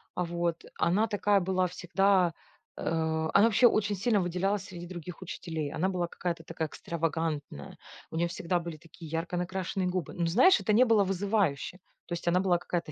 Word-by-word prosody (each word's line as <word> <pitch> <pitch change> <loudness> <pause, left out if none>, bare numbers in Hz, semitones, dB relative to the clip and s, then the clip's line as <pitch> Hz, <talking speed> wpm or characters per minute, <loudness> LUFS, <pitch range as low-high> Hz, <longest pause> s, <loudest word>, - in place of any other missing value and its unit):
вот, 170 -1 -2 0.2
она 205 +6 +3
такая 205 -1 +2
была 185 0 +1
всегда, 180 0 +2 0.4
э, - - -7
она 160 +3 +2
вообще 230 +2 +6
очень 210 -2 +1
сильно 205 +2 +2
выделялась 185 +2 0
среди 175 -3 -8
других 175 0 -8
учителей. 160 -4 -4
Она 185 +4 0
была 180 -2 -1
какая-то 170 -1 -4
такая 160 0 -3
экстравагантная. 160 - -3 0.3
У - - -7
нее 170 +1 +2
всегда 175 +1 -1
были 170 -2 -6
такие 165 0 -13
ярко 165 +2 -2
накрашенные 185 +1 -2
губы. 180 -1 -2
Но 175 - 0
знаешь, 250 - +5
это 215 - 0
не 245 +4 +6
было 225 -4 +4
вызывающе. 195 -4 0 0.3
То - - -4
есть 170 - -5
она 175 +1 +4
была 185 -2 +3
какая-то 175 -2 -3
175 Hz, 175 wpm, -29 LUFS, 165-195 Hz, 0.4 s, вообще